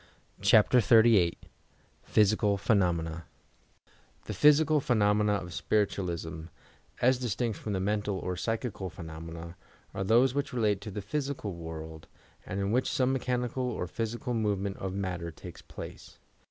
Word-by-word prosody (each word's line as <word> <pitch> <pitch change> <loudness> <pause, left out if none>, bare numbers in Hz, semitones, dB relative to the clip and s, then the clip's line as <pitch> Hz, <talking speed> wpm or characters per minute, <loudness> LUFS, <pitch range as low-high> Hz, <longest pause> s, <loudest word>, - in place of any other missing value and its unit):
CHAPTES 110 +3 +5
XXXVIII 110 -7 +5 0.7
PHYSICAL 105 -1 +3
PHENOUENA 85 -5 0 1.0
The - - -4
physical 150 +1 +5
phenomena 105 -4 +2
o£ 90 - -9
spiritualism, 85 -5 -1 0.6
as 125 +1 +4
distmS 120 -1 -1
from 105 +1 -5
the 95 - 0
mental 105 0 -1
or 90 -1 -3
psychical 110 -1 -3
phenomena, 80 0 -8 0.4
are 95 - -2
those 120 +6 +4
which 140 -1 -2
relate 105 -5 +1
to 110 - -6
the 105 0 -6
physical 135 -3 -3
world, 80 -1 -8 0.4
and 95 - -3
in 100 +1 -1
which 125 +3 +1
some 130 0 +1
mechani 125 -2 -1
cal 130 - -2
or 120 -7 -2
physical 115 +5 -3
movement 100 -3 -1
o£ 95 - -3
matter 90 -3 -3
takes 85 +1 -11
place. - - -10
105 Hz, 140 wpm, -29 LUFS, 90-120 Hz, 1.0 s, CHAPTES